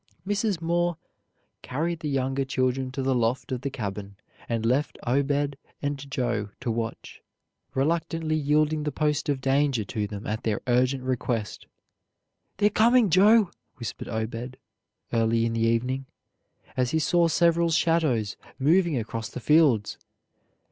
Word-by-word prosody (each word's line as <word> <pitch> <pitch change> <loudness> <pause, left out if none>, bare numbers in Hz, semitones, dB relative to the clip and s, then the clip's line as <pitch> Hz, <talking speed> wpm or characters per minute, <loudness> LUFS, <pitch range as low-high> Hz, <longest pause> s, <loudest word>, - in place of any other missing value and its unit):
Mrs. 205 -2 0
Moore 175 0 +1 0.6
carried 160 +6 -2
the 150 - -3
younger 135 0 0
children 130 0 0
to 130 +1 -4
the 135 0 +2
loft 120 +1 0
of 125 -2 -2
the 140 - -2
cabin, 100 -5 -5 0.3
and 115 -1 -1
left 130 +4 +1
Obed 140 +2 +1 0.2
and 140 -1 -4
Joe 120 -6 -1
to 125 -2 -1
watch, 115 0 -5 0.5
reluctantly 160 +2 0
yielding 150 +1 +2
the 150 0 -2
post 150 +1 0
of 140 -2 0
danger 135 -3 +2
to 105 +1 -3
them 100 0 -7
at 110 +1 -2
their 110 -2 -1
urgent 125 +1 +2
request. 120 -4 -2 0.9
"They're 210 0 +3
coming, 230 -1 +4
Joe!" 205 +3 +5 0.2
whispered 120 -3 -6
Obed 115 +3 -4 0.6
early 115 0 +2
in 115 - -1
the 115 - -1
evening, 125 +4 0 0.7
as 125 -1 +1
he 160 - +1
saw 170 +2 +3
several 170 0 +3
shadows 160 -10 +1 0.2
moving 165 +2 +3
across 115 -1 -4
the - - -7
fields. 140 -6 +3
135 Hz, 140 wpm, -26 LUFS, 115-155 Hz, 0.9 s, Joe